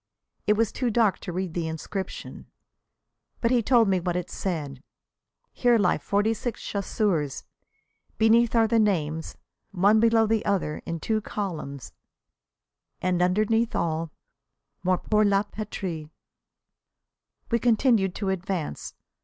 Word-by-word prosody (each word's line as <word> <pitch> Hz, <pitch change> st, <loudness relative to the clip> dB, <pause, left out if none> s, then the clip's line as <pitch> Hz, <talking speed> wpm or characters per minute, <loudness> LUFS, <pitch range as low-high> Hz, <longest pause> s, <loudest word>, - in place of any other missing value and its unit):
It 210 Hz, -, +5 dB
was 220 Hz, 0 st, +1 dB
too 250 Hz, -2 st, -1 dB
dark 220 Hz, -3 st, +2 dB
to 180 Hz, -, -6 dB
read 180 Hz, -1 st, -3 dB
the 170 Hz, -2 st, -2 dB
inscription, 160 Hz, +5 st, -6 dB, 0.9 s
but 230 Hz, -, +1 dB
he 245 Hz, -2 st, +4 dB
told 235 Hz, -1 st, +4 dB
me 190 Hz, -1 st, +2 dB
what 175 Hz, 0 st, -2 dB
it 180 Hz, -1 st, -3 dB
said: 145 Hz, -8 st, -4 dB, 0.7 s
"Here 245 Hz, -1 st, +3 dB
lie 185 Hz, -5 st, +2 dB
forty 205 Hz, +3 st, +1 dB
six 235 Hz, 0 st, -4 dB
chasseurs." 195 Hz, -, -1 dB, 0.7 s
Beneath 225 Hz, +2 st, +4 dB
are 225 Hz, -1 st, +5 dB
the 230 Hz, +1 st, +2 dB
names, 160 Hz, -7 st, 0 dB, 0.3 s
one 200 Hz, +3 st, +4 dB
below 225 Hz, 0 st, +4 dB
the 220 Hz, 0 st, +1 dB
other 180 Hz, -6 st, -1 dB
in 165 Hz, 0 st, -3 dB
two 220 Hz, +5 st, -1 dB
columns, 140 Hz, -, -5 dB, 1.1 s
and 180 Hz, -1 st, 0 dB
underneath 215 Hz, +5 st, +2 dB
all: 165 Hz, 0 st, -1 dB, 0.7 s
"Morts 185 Hz, 0 st, 0 dB
pour 215 Hz, 0 st, +4 dB
la 200 Hz, -1 st, +3 dB
Patrie." 190 Hz, -7 st, -6 dB, 1.4 s
We 235 Hz, -, +3 dB
continued 225 Hz, -5 st, +2 dB
to 200 Hz, -2 st, -2 dB
advance. 185 Hz, -, -3 dB
200 Hz, 130 wpm, -26 LUFS, 175-225 Hz, 1.4 s, It